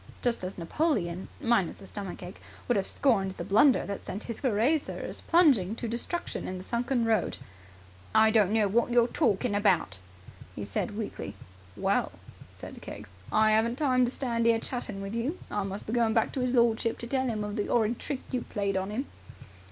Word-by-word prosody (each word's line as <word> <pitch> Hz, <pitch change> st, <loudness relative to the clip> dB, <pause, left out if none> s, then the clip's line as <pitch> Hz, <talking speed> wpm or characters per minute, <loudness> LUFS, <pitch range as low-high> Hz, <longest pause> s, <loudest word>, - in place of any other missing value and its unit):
Just 240 Hz, -5 st, +1 dB
as 185 Hz, +1 st, -5 dB
Napoleon, 185 Hz, -, -1 dB
minus 230 Hz, -7 st, +1 dB
a -, -, -11 dB
stomach 195 Hz, -2 st, -6 dB
ache, 180 Hz, +2 st, -9 dB, 0.3 s
would 245 Hz, -, +2 dB
have 195 Hz, -, 0 dB
scorned 195 Hz, -8 st, +1 dB
the -, -, -4 dB
blunder 220 Hz, +8 st, +4 dB
that 200 Hz, -1 st, -5 dB
sent 205 Hz, -, -5 dB
his 230 Hz, -, -5 dB
Cuirassiers 260 Hz, +5 st, 0 dB
plunging 265 Hz, -, +4 dB
to 235 Hz, -, -4 dB
destruction 240 Hz, +10 st, -3 dB
in 185 Hz, -, -4 dB
the 185 Hz, -, -8 dB
sunken 240 Hz, +2 st, 0 dB
road. 220 Hz, -4 st, +1 dB, 0.8 s
"I 220 Hz, 0 st, +6 dB
don't 210 Hz, -3 st, +4 dB
know 215 Hz, -2 st, +3 dB
what 230 Hz, +5 st, +2 dB
you're 240 Hz, -1 st, +4 dB
torkin' 205 Hz, -4 st, +1 dB
about," 185 Hz, -, +2 dB, 0.6 s
he 105 Hz, -, -5 dB
said 155 Hz, -, -3 dB
weakly. 205 Hz, -, -5 dB, 0.4 s
"Well," -, -, +1 dB, 0.4 s
said -, -, -10 dB
Keggs, -, -, -9 dB, 0.2 s
"I 215 Hz, 0 st, +4 dB
haven't 225 Hz, +2 st, +2 dB
time 255 Hz, -4 st, +3 dB
to -, -, -1 dB
stand 235 Hz, -3 st, -1 dB
'ere 230 Hz, -1 st, +5 dB
chatting 220 Hz, -5 st, -5 dB
with 195 Hz, +2 st, -5 dB
you. 250 Hz, +10 st, -2 dB
I 205 Hz, -, 0 dB
must 195 Hz, +1 st, -5 dB
be 215 Hz, -, -4 dB
going 230 Hz, -2 st, +2 dB
back 225 Hz, -, +2 dB
to 265 Hz, -, -3 dB
'is 250 Hz, 0 st, +1 dB
lordship, 230 Hz, -1 st, +2 dB
to -, -, -6 dB
tell 260 Hz, +1 st, 0 dB
'im 215 Hz, -2 st, -2 dB
of 210 Hz, 0 st, -4 dB
the 210 Hz, -, -2 dB
'orrid 235 Hz, 0 st, +2 dB
trick 275 Hz, -3 st, -4 dB
you 255 Hz, -, -1 dB
played 200 Hz, -2 st, -2 dB
on 190 Hz, +1 st, -2 dB
him." 240 Hz, +7 st, -2 dB
225 Hz, 195 wpm, -29 LUFS, 200-245 Hz, 0.8 s, I